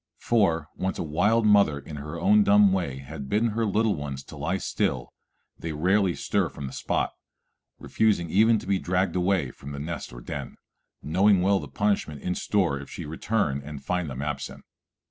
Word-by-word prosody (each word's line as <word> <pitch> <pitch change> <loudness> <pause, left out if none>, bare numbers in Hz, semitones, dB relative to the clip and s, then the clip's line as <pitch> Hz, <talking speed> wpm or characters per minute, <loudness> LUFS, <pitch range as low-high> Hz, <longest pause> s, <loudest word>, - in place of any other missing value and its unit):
For, 85 -10 +1
once 95 +1 -2
a - - -2
wild 105 +9 +2
mother 100 -8 +5
in 75 +2 -8
her 75 +4 -6
own 105 +4 +5
dumb 100 -1 +5
way 85 -9 -1
has 70 +3 -8
bidden 105 +12 +1
her 110 +1 -1
little 105 +1 +2
ones 70 -3 -5
lie - - -2
still, - - -2 0.5
they 80 -1 -4
rarely 95 +4 +2
stir - - 0
from 70 - -7
the 65 - -7
spot, - - -1 0.7
refusing 105 -6 +1
even 110 +3 +5
to - - -7
be 95 0 +1
dragged 90 0 0
away 90 +1 +1
from 70 +1 -10
the 70 - -5
nest 80 +4 -5
or - - -10
den, - - -6 0.5
knowing 95 +4 +3
well 100 +1 +3
the - - -7
punishment 100 -8 -1
in 90 - -1
store 90 -8 0
if 70 - -10
she - - -7
return 80 -2 -1
and 70 -1 -9
find 90 -2 -1
them 65 +1 -5
absent. 75 -3 -5
90 Hz, 185 wpm, -26 LUFS, 75-100 Hz, 0.7 s, mother